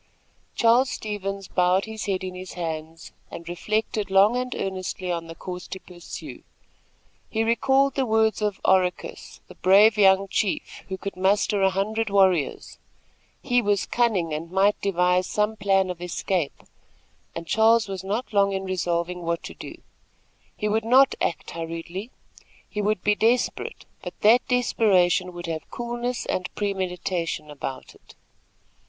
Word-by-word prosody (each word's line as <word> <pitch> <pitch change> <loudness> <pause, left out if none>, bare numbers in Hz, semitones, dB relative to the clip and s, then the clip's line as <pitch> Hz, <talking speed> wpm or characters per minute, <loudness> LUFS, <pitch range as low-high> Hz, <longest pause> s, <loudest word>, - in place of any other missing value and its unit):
Charles 240 +3 +4
Stevens 200 -4 -4
bowed 180 +1 +2
his 220 -1 -6
head 190 -2 -1
in 185 -1 -5
his 185 0 -8
hands 160 -1 -6 0.2
and 170 - -9
reflected 210 +3 -2
long 195 +4 +5
and 250 0 -2
earnestly 185 -1 -3
on 170 -1 -3
the 165 - -9
course 180 +1 -7
to 190 - -7
pursue. 175 -2 -10 0.9
He 220 0 0
recalled 265 +4 +2
the 265 -2 0
words 220 0 +2
of 210 -2 -1
Oracus, 185 -1 0
the - - -12
brave 205 +3 +5
young 195 0 +5
chief, 195 0 -2
who 190 - -3
could 200 +1 -6
muster 195 +2 +2
a 190 - +5
hundred 210 +3 -1
warriors. 190 -6 +1 0.6
He 245 -2 +2
was 205 -3 +1
cunning 205 -10 +1
and 160 +2 -4
might 195 +3 +2
devise 180 -1 +2
some 210 +1 0
plan 195 -2 +2
of 175 -1 -9
escape, 175 -2 -2 0.7
and 165 - -5
Charles 220 +4 +4
was 190 -2 -5
not 215 +5 -3
long 200 -1 +3
in 190 0 -2
resolving 180 -1 -2
what 170 0 -2
to - - -7
do. - - -9 0.8
He 210 - -1
would 215 +1 +1
not 260 +4 +5
act 170 - -2
hurriedly. 165 +5 -6 0.6
He 210 - -4
would 210 -2 0
be 210 - +4
desperate; 230 +4 0 0.2
but - - -8
that 230 +4 +5
desperation 195 -8 +2
would 175 0 -7
have 160 -2 -5
coolness 240 0 -3
and 185 0 -2
premeditation 180 -5 -2
about 135 -2 -7
it. - - -19
195 Hz, 150 wpm, -24 LUFS, 180-220 Hz, 0.9 s, long